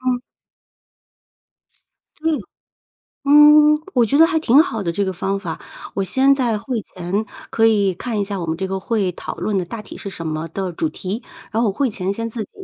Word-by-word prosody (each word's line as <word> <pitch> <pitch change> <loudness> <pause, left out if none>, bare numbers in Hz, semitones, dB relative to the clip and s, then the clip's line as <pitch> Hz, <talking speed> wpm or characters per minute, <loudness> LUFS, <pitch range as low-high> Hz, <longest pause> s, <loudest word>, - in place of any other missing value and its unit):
嗯。 255 -1 0 2.0
嗯。 320 -6 +1 0.8
嗯， 300 +1 +7
我 245 -2 +4
觉 275 +6 +2
得 325 - +8
还 330 -1 +1
挺 285 +1 +5
好 225 - -4
的， 170 -3 -1
这 200 +3 -1
个 190 - -2
方 195 +2 -2
法。 170 -5 -5 0.3
我 195 - -1
先 265 +7 +3
在 245 -5 0
会 230 +1 -3
前 185 +4 -3 0.3
可 225 0 +4
以 200 -4 +3
看 225 +4 -3
一 200 - +1
下 200 -1 -4
我 165 - -4
们 160 - -1
这 190 +1 -2
个 190 0 -3
会， 195 -2 0
讨 - - -7
论 205 -3 -1
的 - - -1
大 215 +6 -7
体 210 - -10
是 200 - -6
什 165 -3 -7
么 155 +1 -3
的 185 +2 -4
主 160 -1 -1
题， 200 +6 -5 0.3
然 225 +1 +1
后 230 - +2
我 - - 0
会 270 +7 0
前 195 -3 -2
先 230 +3 -3
自 225 -2 -4
己 - - -14
210 Hz, 230 characters per minute, -20 LUFS, 190-255 Hz, 2.0 s, 得